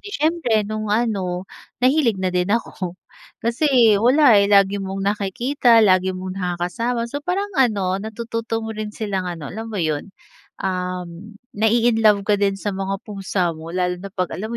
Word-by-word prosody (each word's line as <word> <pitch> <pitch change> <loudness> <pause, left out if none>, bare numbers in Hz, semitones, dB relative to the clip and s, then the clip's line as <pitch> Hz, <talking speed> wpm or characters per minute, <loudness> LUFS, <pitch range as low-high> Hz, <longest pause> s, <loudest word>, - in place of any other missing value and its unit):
di 415 - -10
siyempre 305 - +1
noong 215 +1 -4
ano, 200 -5 -1 0.4
nahilig 260 -5 +3
na 185 -1 -2
din 180 +1 0
ako, 190 -5 -2 0.5
kasi 235 -4 +4
wala 245 -2 +6
eh, 200 - +2
lagi 200 0 +4
mong 195 0 -4
nakikita, 225 +4 +2
lagi 185 -1 +3
mo 185 0 -5
nakakasama, 185 +6 -2
so 285 +5 -5
parang 385 +6 -2
ano, 195 -6 +1
natututo 225 +1 -4
mo 220 - -4
rin 215 -1 -5
silang 195 -4 -3
ano, 165 -4 -6
alam 225 +2 -6
mo 215 - -6
'yon, 155 -2 -1 0.6
um, 180 +1 -4 0.2
na-i-inlove 220 -2 +3
ka 205 -1 +1
din 195 -1 +1
sa 205 +1 -3
mga 195 0 -2
pusa 190 -4 -2
mo, 160 +1 -10
lalo 180 0 -2
na 200 - -7
'pag 185 -2 -3
alam 215 +3 -5
mo 235 - -4
205 Hz, 170 wpm, -21 LUFS, 185-230 Hz, 0.6 s, wala